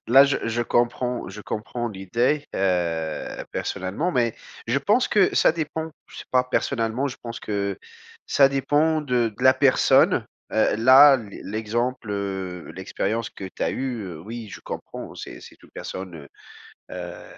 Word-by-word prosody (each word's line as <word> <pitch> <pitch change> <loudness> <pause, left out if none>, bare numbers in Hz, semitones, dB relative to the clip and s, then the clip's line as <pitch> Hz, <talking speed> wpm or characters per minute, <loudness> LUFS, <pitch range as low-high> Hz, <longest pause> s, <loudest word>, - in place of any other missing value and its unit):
Là, 135 +3 +8
je 140 - +1
je 115 +1 0
comprends, 120 -1 0
je 105 +3 -9
comprends 120 +2 -4
l'idée, 115 +9 0
heu, 85 -4 -1
personnellement, 100 - -2
mais 120 -3 +1 0.3
je 120 +4 +2
pense 210 - +2
que 200 -3 +3
ça - - +5
dépend, 160 0 -4 0.2
je - - -15
sais - - -8
pas, 125 0 +3
personnellement 125 0 0
je 130 - -5
pense 115 -1 -6
que 100 -2 -2 0.5
ça 135 -1 +5
dépend 145 +4 +2
de 125 -4 +1
de - - -8
la 130 - +8
personne, 135 - +4 0.3
heu, 110 - +2
là, 135 +5 +8
l'e 105 -4 -9
l'exemple, 110 +2 -2
heu 95 -3 -4
l'expérience 105 +4 -2
que 95 - -9
tu - - -5
as - - +1
eu, 125 -5 -3
heu, 80 -3 -8
oui, 110 +3 -7
je - - -9
comprends, - - -7
c'est - - -9
c'est - - -14
une - - -18
personne, 95 -2 -7
heu, 70 -2 -11 0.7
heu, 90 -1 -7
120 Hz, 165 wpm, -24 LUFS, 100-135 Hz, 0.7 s, Là